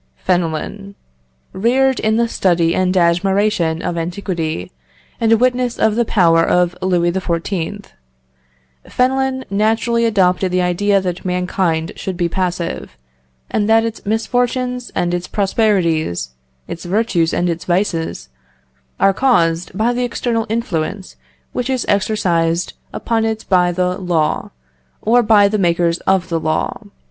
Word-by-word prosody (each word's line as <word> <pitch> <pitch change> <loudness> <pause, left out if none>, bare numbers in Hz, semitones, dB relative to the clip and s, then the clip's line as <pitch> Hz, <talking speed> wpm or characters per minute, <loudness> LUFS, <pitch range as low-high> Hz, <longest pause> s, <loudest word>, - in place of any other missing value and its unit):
Fenelon. 180 - -2 0.6
Reared 255 +6 +2
in 220 0 +1
the 235 0 +2
study 170 -6 +1
and 185 +1 +1
admiration 175 -1 +1
of 170 -1 -2
antiquity, 165 - -3 0.5
and 225 -1 +2
a 225 - +6
witness 250 0 +1
of 220 -1 +2
the 235 0 +1
power 165 -6 +3
of 180 +1 +2
Louis 175 -2 +1
XIV., 185 +2 -3 1.0
Fenelon 260 +1 0
naturally 225 +3 +1
adopted 190 -4 +2
the 180 0 +1
idea 195 +3 +2
that 180 -1 -4
mankind 180 -3 -1
should 185 -2 -5
be 175 -1 +1
passive, 175 -1 -3 0.5
and 210 0 0
that 225 0 +4
its 225 -1 -5
misfortunes 245 +3 -1
and 175 0 0
its 175 0 -2
prosperities, 170 - 0 0.4
its 165 - -7
virtues 180 -3 +1
and 175 - 0
its 170 -1 -3
vices, 175 - -1 0.7
are 195 - +4
caused 180 -7 +1
by 230 +3 +2
the 250 +1 -1
external 235 -1 -1
influence 200 -4 -3 0.4
which 250 +1 -2
is 260 -2 -1
exercised 180 -5 0 0.2
upon 230 -1 -1
it 220 0 -2
by 180 -2 +3
the 180 +1 -1
law, 170 -4 0 0.5
or 240 +3 +4
by 210 -3 +5
the 210 +1 -1
makers 170 -1 +1
of 190 -1 +2
the 165 -1 0
law. 155 0 -2
190 Hz, 135 wpm, -18 LUFS, 170-225 Hz, 1.0 s, a